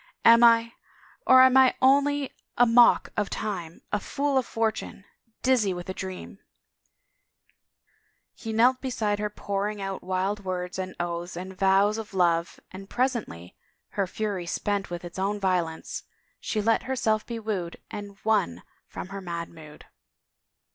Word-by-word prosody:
"Am 230 +1 +8
I?... 230 0 +5 0.5
Or 260 0 +8
am 260 0 +5
I 260 -1 +6
only 280 +1 +3 0.3
a 245 - +6
mock 240 +1 +5
of 210 -2 -1
time, 175 -6 -5
a 210 - +1
fool 280 +7 -2
of 255 - -4
fortune, 220 -3 -3 0.4
dizzy 230 -8 +2
with 175 +1 -7
a - - -2
dream? 190 +1 -7 1.0
" - - -43
He 225 - -7
knelt 245 +4 +3
beside 220 -6 -1
her 210 0 -1
pouring 205 0 -3
out 195 -1 -4
wild 190 +3 -2
words 180 0 -4
and 185 0 -5
oaths 175 0 -4
and 185 +1 -7
vows 195 +3 +3
of 210 -3 -8
love 170 -2 +1
and 195 +1 -10
presently, 235 - -2 0.3
her 195 -2 -1
fury 195 -3 -3
spent 200 +3 -2
with 175 0 -6
its 175 +2 -8
own 200 +2 -1
violence, 180 -4 -1 0.4
she 215 -2 -2
let 225 +1 +3
herself 220 -5 +1
be 235 - -6
wooed 205 -6 -4
and 205 -1 -7
won 205 - +1 0.2
from 185 - -8
her 195 0 -6
mad 170 -2 -5
mood. 155 -2 -14
200 Hz, 155 wpm, -26 LUFS, 185-230 Hz, 1.0 s, Am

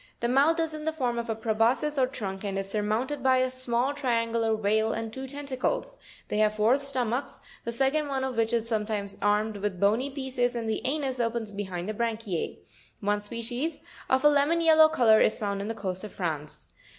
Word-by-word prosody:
The 235 - 0
mouth 285 +7 +3
is 325 -1 0
in 305 0 -6
the 315 - +1
form 250 -6 -1
of 235 0 -5
a 225 - 0
preboscis 230 +6 +1
or 255 - +4
trunk, 195 -7 -5
and 195 -1 -2
is 195 0 -4
surmounted 220 +7 -1
by 260 0 +4
a 255 0 +1
small 255 +1 0
triangular 230 -4 0
veil, 220 +1 +1
and 225 0 -4
two 265 +2 -6
tentacles; 290 - -3 0.3
they 210 - -1
have 215 0 +3
four 215 +4 +4
stomachs, 260 -2 -2 0.3
the 235 - -2
second 270 +5 +1
one 270 -2 -1
of 260 -2 -2
which 225 0 +1
is 230 -1 0
sometimes 210 -3 -2
armed 210 +1 +1
with 200 -2 -3
bony 220 +8 +2
pieces, 260 -3 -1
and 230 -1 -3
the 220 - -1
anus 270 -2 -1
opens 230 -2 -1
behind 190 -3 -4
the 215 - -2
branchiz. 220 -5 -2 0.4
One 205 -1 0
species, 240 +8 -3 0.3
of 260 +2 +2
a - - +9
lemon 295 +4 +3
yellow 315 -1 +7
colour, 235 -8 +5
is - - +3
found 200 -2 -2
on 200 - -4
the 225 - -3
coasts 185 -3 -4
of 210 - -7
France. 155 -5 -4
235 Hz, 205 wpm, -28 LUFS, 215-265 Hz, 0.4 s, a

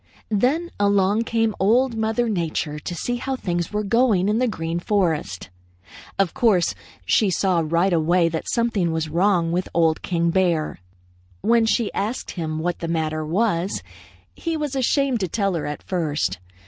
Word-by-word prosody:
"Then 275 - +1
along 200 +2 +2
came 225 -1 +1
Old 235 +5 +3
Mother 225 +2 0
Nature 160 -6 -2
to 175 - -5
see 245 +8 -2
how 265 +2 -3
things 175 -7 -2
were 210 0 -1
going 210 -3 +2
in 215 +2 +1
the 255 - +2
Green 165 -5 -3
Forest. 160 - -1 0.7
Of 195 -4 +1
course 200 -8 +2 0.3
she 210 - +3
saw 185 -1 +1
right 170 +4 +1
away 170 +1 +3
that 165 -1 -3
something 225 -8 +1
was 160 -1 -2
wrong 170 0 +2
with 180 +2 -1
Old 165 -2 +2
King 170 -2 0
Bear. 170 - 0 0.6
When 230 0 +3
she 225 -1 +1
asked 220 +6 -3
him 160 -3 -4
what 175 +2 -2
the 165 - -4
matter 155 -1 -1
was, 180 +2 0 0.5
he 330 -1 -3
was 295 -3 -3
ashamed 270 -1 +1
to 190 - -1
tell 195 +2 0
her 165 -4 -2
at 150 - -6
first. 150 - -1
190 Hz, 165 wpm, -22 LUFS, 165-225 Hz, 0.7 s, Old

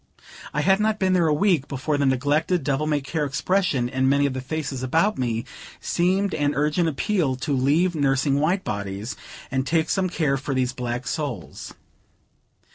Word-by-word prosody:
I 150 - -1
had 195 +5 +3
not 215 0 +1
been 190 -2 +1
there 175 -3 +3
a - - +2
week, 160 -2 +2
before 145 +2 -2
the 140 -1 +1
neglected, 145 +6 +1
devil 145 +2 0
may 150 -2 +1
care 150 +3 -2
expression 145 -2 0
in 130 +1 +1
many 140 +1 +3
of 140 - 0
the 130 - -4
faces 135 -1 -4
about 165 +11 +1
me, 115 -2 -1 0.3
seemed 190 +3 +1
an 145 -1 0
urgent 150 +4 +1
appeal 160 -2 0
to 140 +3 -3
leave 150 +8 +2
nursing 140 -1 +1
white 175 +6 +1
bodies, 100 +2 -4 0.4
and 130 0 0
take 160 -1 +1
some 190 -2 +1
care 150 -5 0
for 135 0 -3
these 130 -1 0
black 125 0 -4
souls. 135 - -5
145 Hz, 180 wpm, -24 LUFS, 130-170 Hz, 0.4 s, had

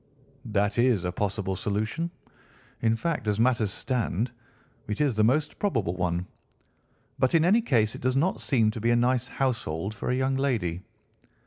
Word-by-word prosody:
"That 105 -1 0
is 120 -6 +3
a 90 - 0
possible 100 0 -2
solution—in 110 - -4
fact, 150 -3 -2
as 105 0 +1
matters 115 -3 +3
stand, 120 -1 -1 0.6
it 105 -1 -3
is 140 -6 +2
the 110 - +3
most 140 +7 +1
probable 115 - 0
one. 90 -1 -1 0.9
But 130 +5 +3
in 165 0 +4
any 210 +6 +5
case 115 - +2
it - - -8
does 130 +1 +1
not 165 +8 +1
seem 115 -6 +2
to 110 - -6
be 115 - +1
a 120 - +4
nice 125 +1 +2
household 110 - -2
for 100 - -4
a 125 - +2
young 130 +1 +1
lady." 105 -11 -1
115 Hz, 165 wpm, -27 LUFS, 105-130 Hz, 0.9 s, any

